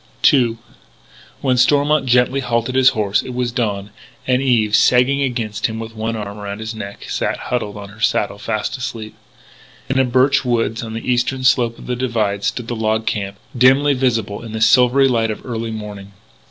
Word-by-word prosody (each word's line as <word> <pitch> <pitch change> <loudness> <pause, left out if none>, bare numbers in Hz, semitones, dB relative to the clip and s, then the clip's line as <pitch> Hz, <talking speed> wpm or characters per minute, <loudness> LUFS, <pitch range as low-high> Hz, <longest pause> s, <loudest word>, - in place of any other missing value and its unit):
II 120 -4 +2 0.8
When 130 -2 +1
Stormont 145 +2 +3
gently 125 +2 +3
halted 120 -1 -1
his 130 0 +5
horse 100 -1 +1
it 125 - -8
was 125 -1 -1
dawn, 105 -5 -2 0.3
and 130 0 +2
Eve, 115 -6 +2
sagging 125 +5 +4
against 115 -5 -1
him 110 -1 -6
with 115 0 -7
one 110 +1 -3
arm 105 -1 -6
around 100 0 -5
his 110 +1 -5
neck, 100 -2 -8
sat - - -2
huddled 105 -4 -3
up 100 - -7
on 100 - -10
her 105 +2 -15
saddle 100 -2 0
fast 110 +5 -2
asleep. 115 -4 -6 0.8
In 135 0 +1
a - - +5
birch 130 +3 +2
woods, 115 -2 0
on 110 -1 -6
the 115 - -6
eastern 125 +2 0
slope 120 -3 +2
of - - -12
the 125 - -2
divide, 110 -5 -1
stood 115 +3 -2
the 120 - -3
log 110 0 -1
camp, 100 -1 -3 0.2
dimly 135 +4 +4
visible 115 -6 -1
in 115 -2 -8
the 110 - -4
silvery 125 +3 +5
light 115 -3 +1
of 110 - -6
early 115 -2 -4
morning. 105 -2 -7
115 Hz, 195 wpm, -19 LUFS, 110-125 Hz, 0.8 s, his